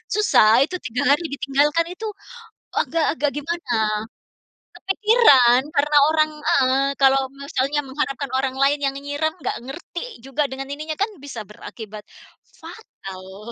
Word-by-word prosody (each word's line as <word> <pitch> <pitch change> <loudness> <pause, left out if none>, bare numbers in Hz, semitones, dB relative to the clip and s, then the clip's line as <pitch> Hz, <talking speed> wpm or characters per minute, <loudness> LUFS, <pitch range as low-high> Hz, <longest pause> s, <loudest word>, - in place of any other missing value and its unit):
susah 250 - +5
itu 360 +5 -4
3 250 +1 0
hari 325 +3 +2
ditinggalkan 295 +3 0
itu, 440 +5 -6 0.7
agak-agak 305 -3 0
gimana. 295 -5 -3 1.0
Kepikiran, 380 - +4
karena 295 +1 +3
orang 310 -1 +2
heeh, 270 0 +2
kalau 270 0 +5
misalnya 280 +1 -2
mengharapkan 275 0 -3
orang 265 -1 -1
lain 275 +2 +2
yang 275 0 0
nyiram 290 +3 -2
enggak 335 - -4
ngerti 310 - -8
juga 275 +2 -1
dengan 265 +1 -6
ininya 305 +2 -5
kan 405 - 0
bisa 270 -5 -7
berakibat 210 0 -10 0.4
fatal. 195 - -11
280 Hz, 125 wpm, -22 LUFS, 260-310 Hz, 1.0 s, susah